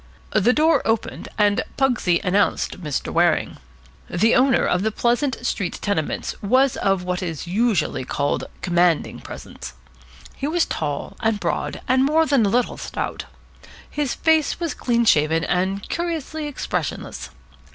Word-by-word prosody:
The 215 +3 +4
door 305 +1 +3
opened, 225 0 -2
and 205 -1 +3 0.2
Pugsy 245 -10 +2
announced 195 -1 +1
Mr. 150 -5 -3
Waring. - - +2 0.5
The 220 +6 +3
owner 260 0 +4
of 180 - +1
the 220 +2 0
Pleasant 245 +3 0
Street 195 -7 -2
Tenements 200 -7 -2
was 255 +5 +3
of 195 -2 +1
what 180 0 -2
is 165 -4 -4
usually 195 - 0
called 140 +2 -1 0.2
commanding 175 -2 +2
presence. - - -9 0.6
He 275 - -3
was 335 +2 +2
tall 145 -2 -4
and 220 -2 0
broad, - - -2
and 260 0 +3
more 310 +4 +3
than 275 -5 +3
a 200 - +2
little 245 +3 0
stout. - - -4 0.6
His 295 -4 -2
face 320 -1 +2
was 335 -3 -2
clean 235 -1 +1
shaven 160 -4 +3
and 190 +2 -1
curiously 320 -3 -3
expressionless. 290 - -4
225 Hz, 140 wpm, -22 LUFS, 180-270 Hz, 0.6 s, The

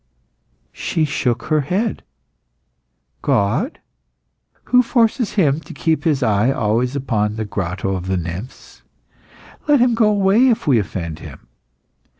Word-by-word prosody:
She 160 - -1
shook 125 -4 -1
her 155 -1 +1
head. 195 - -1 1.2
"God? 120 - 0 0.9
Who 250 0 +4
forces 235 -1 +1
Him 155 -7 +2
to - - -12
keep 160 0 0
His 145 -5 +1
eye 105 +1 +2
always 120 +1 0
upon 110 -6 -1
the 110 0 -3
Grotto 95 -1 -3
of 90 0 -5
Nymphs? 90 +5 -5 0.9
Let 295 -2 +5
Him 245 0 +3
go 225 -2 +3
away 205 +4 +4
if 235 -4 +1
we 135 -7 +4
offend 85 -5 -5
Him! - - -11
135 Hz, 130 wpm, -19 LUFS, -, 1.2 s, Let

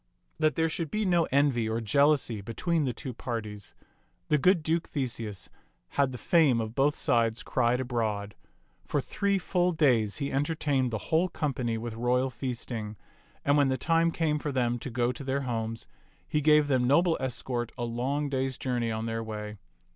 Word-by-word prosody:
That 155 -3 +2
there 160 0 +2
should 165 -1 -3
be 215 +4 -1
no 175 -3 +3
envy 135 -5 +2
or 110 +1 -1
jealousy 135 -1 +2
between 155 - -1
the 130 - 0
two 125 +2 -6
parties, 110 -4 -6 0.5
the 150 - +3
good 180 +2 +4
Duke 165 +1 0
Theseus 115 - -4 0.4
had 140 -2 +1
the 125 - -6
fame 145 -1 +3
of 110 -1 -3
both 140 +4 +2
sides 115 -1 +1
cried 125 0 +1
abroad. 110 -5 -2 0.5
For - - -1
three 200 -1 0
full 180 -1 +1
days 120 -10 +2
he 140 -2 -2
en 135 +2 +1
tertained 145 -4 0
the 110 - -2
whole 165 +3 +3
company 125 -8 -2
with 115 0 -5
royal 125 +3 +1
feasting; 120 -4 -5 0.5
and 145 +1 +4
when 145 -1 +4
the 130 0 0
time 165 +5 +2
came 155 -2 0
for 145 - -3
them 120 -2 0
to 130 - -6
go 120 0 0
to 125 - -8
their 135 +1 -1
homes, 115 -3 -3 0.4
he 150 +10 0
gave 150 0 +5
them 130 -3 +2
noble 165 +5 +4
escort 125 -2 -2
a 120 - -3
long 130 +5 -1
day's 135 -1 -1
journey 120 -3 -1
on 110 0 -3
their 115 0 -2
way. 105 -1 -6
130 Hz, 185 wpm, -28 LUFS, 115-150 Hz, 0.5 s, gave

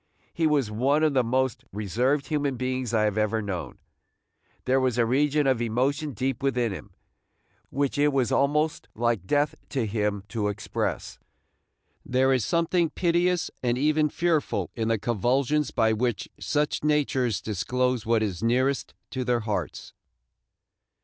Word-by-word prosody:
He 165 -1 +1
was 140 -8 +1
one 135 +8 +2
of 155 -2 +3
the 130 -2 +3
most 130 +1 0
reserved 120 +8 0
human 145 -4 -1
beings 130 -1 -2
I 110 -2 +2
have 105 0 +1
ever 110 +1 +1
known. 100 -4 -5 0.9
There 130 +1 +3
was 130 -2 0
a 120 - +3
region 145 +4 +2
of 130 -3 +2
emotion 135 +6 0
deep 130 +2 -2
within 125 -4 +1
him, 95 -1 -9 0.7
which 140 +1 -1
it 145 - +4
was 135 -4 +1
almost 150 +3 +1
like 115 -5 0
death 145 0 +2 0.2
to 130 -5 -1
him 105 -2 -1
to 110 -4 -1
express. 105 +2 -3 0.8
There 130 +1 +2
is 130 -4 +1
something 170 - +1
piteous 175 +2 +1
and 120 -1 0
even 150 +2 +2
fearful 165 -2 0
in 115 -2 -1
the 115 0 +2
convulsions 125 +7 +1
by 110 -2 +2
which 120 -1 -1
such 150 0 -1
natures 135 - +1
disclose 120 +6 -1
what 115 -1 +2
is 95 -4 -3
nearest 130 +4 0 0.2
to 130 - -2
their 120 -1 +1
hearts. 105 -2 -4
130 Hz, 150 wpm, -26 LUFS, 115-145 Hz, 0.9 s, it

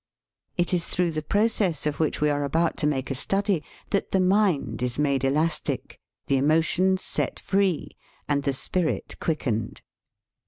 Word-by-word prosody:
It 175 +1 +1
is 175 -2 +1
through 175 -1 +1
the 155 -1 -2
process 200 -3 +1
of 150 -1 -1
which 155 -2 0
we 150 0 +3
are 145 0 0
about 165 +4 +1
to 150 - +1
make 135 -2 -1
a - - +1
study 195 +4 0 0.3
that 200 - 0
the 190 - +2
mind 185 - +2
is 125 -1 -2
made 140 -3 +1
elastic, 150 +5 -1 0.3
the 135 - +2
emotions 165 +6 +2
set - - -2
free, 195 -4 0 0.4
and 145 -1 +1
the 140 - 0
spirit 165 +5 -1
quickened. 125 - -2
160 Hz, 160 wpm, -25 LUFS, 140-185 Hz, 0.4 s, we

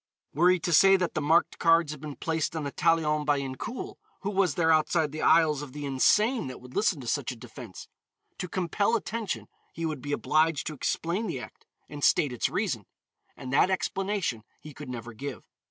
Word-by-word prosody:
Were 175 +5 +4
he 185 - +4
to 175 - -1
say 195 +4 +7
that 180 -3 0
the 155 - -1
marked 160 +4 +2
cards 165 -2 +4
had 150 -2 -8
been 150 -2 -7
placed 160 -1 -2
on 160 - -2
the 140 - -3
talion 155 -2 +2
by 145 -1 +2
Incoul, 135 - -6 0.2
who 200 - -2
was 190 -6 +1
there 165 -2 +3
outside 155 -1 +2
the 155 - -5
aisles 160 -3 +4
of 140 -3 -8
the 145 0 -5
insane 210 - +2
that 130 - -8
would 125 0 -14
listen 205 -7 +2
to 120 - -9
such 135 0 -1
a - - -7
defense? 115 -3 -10 0.5
To 180 - -3
compel 190 +5 0
attention, 225 -2 -3 0.3
he 165 - -4
would 155 -4 -3
be 145 - -5
obliged 155 +1 +1
to 155 - -4
explain 170 - -2
the 160 -8 -3
act, - - -12 0.2
and 145 0 -8
state 140 -4 +3
its 120 - 0
reason. - - -2 0.5
And 130 0 -6
that 150 - +4
explanation 190 - -1 0.2
he 150 - -11
could 145 -1 -9
never 120 -1 -7
give. 135 +4 -7
155 Hz, 205 wpm, -28 LUFS, 140-175 Hz, 0.5 s, say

